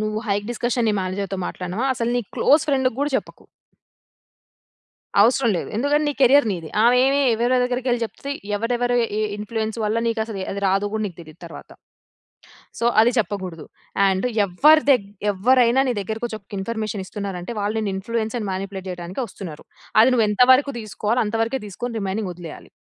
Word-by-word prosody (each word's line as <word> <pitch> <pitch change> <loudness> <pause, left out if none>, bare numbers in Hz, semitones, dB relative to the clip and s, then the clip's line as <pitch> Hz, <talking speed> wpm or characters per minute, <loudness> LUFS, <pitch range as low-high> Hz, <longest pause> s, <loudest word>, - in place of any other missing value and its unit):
నువ్వు 215 0 -2
hike 205 0 -1
discussion 240 0 -1
నీ - - +2
మేనేజర్‌తో 190 +1 -3
మాట్లాడినవా 185 +8 -3
అసలు 235 -1 -1
నీ - - +1
క్లోజ్ 300 +2 +4
ఫ్రెండ్‌కి 265 -4 +1
గూడా 290 +1 0
చెప్పకు. - - -7 1.8
అవసరం 235 +3 +4
లేదు. - - -4
ఎందుకంటే 290 +5 +1
నీ 290 - 0
కెరియర్ 270 +1 +6
నీది. 170 -5 -4
ఆమె 240 +2 +5
ఏమి 275 +1 +2
ఎవరెవరి 245 +2 +2
దగ్గరకెళ్లి 250 -1 -1
చెప్తే 275 +5 -7 0.3
ఎవరెవరు 245 +3 0 0.2
ఏ - - +1 0.2
ఇన్‌ఫ్లూయన్స్ 220 +1 -4
వల్ల 215 +2 0
నీకు 230 -1 0
అసలు 220 -3 -7
అది 200 - -4
రాదు 195 +2 +1
గూడా 220 0 -1
నీకు 180 - -9
తెలియదు 160 0 -14
తరువాత. 165 - -11 1.1
సో, 235 - 0 0.2
అది 240 +2 +4
చెప్పకూడదు. 190 -5 -3 0.4
అండ్ 190 +3 0 0.2
ఎవ్వరి 300 - +5
దగ్గ్ 200 -7 +2 0.2
ఎవ్వరైనా 245 +5 +4
నీ - - +1
దగ్గరకొచ్చి 220 +2 -4
ఒక్క 200 - -33
ఇన్‌ఫ‌మేషన్ 215 -1 -3
ఇస్తున్నారంటే 195 -1 -6
వాళ్ళు 210 +2 -1
నిన్ను 210 -2 -2
ఇన్‌ఫ్లూ‌యన్స్ 220 +3 -3
అండ్ 205 -3 -4
మానిపులేట్ 190 0 -5
చేయడానికే 180 +5 -5
వస్తున్నారు. 175 -6 -9 0.4
అది 235 - +6
నువ్వు 230 -3 +3
ఎంత 210 +3 0
వరకు 280 +2 +2
తీసుకోవాలో 215 +2 -1
అంతవరకే 225 +4 -1
తీసుకొని 235 +4 -5
రిమైనింగ్ 195 +1 -2
వదిలేయాలి. 170 -3 -10
220 Hz, 165 wpm, -22 LUFS, 195-245 Hz, 1.8 s, కెరియర్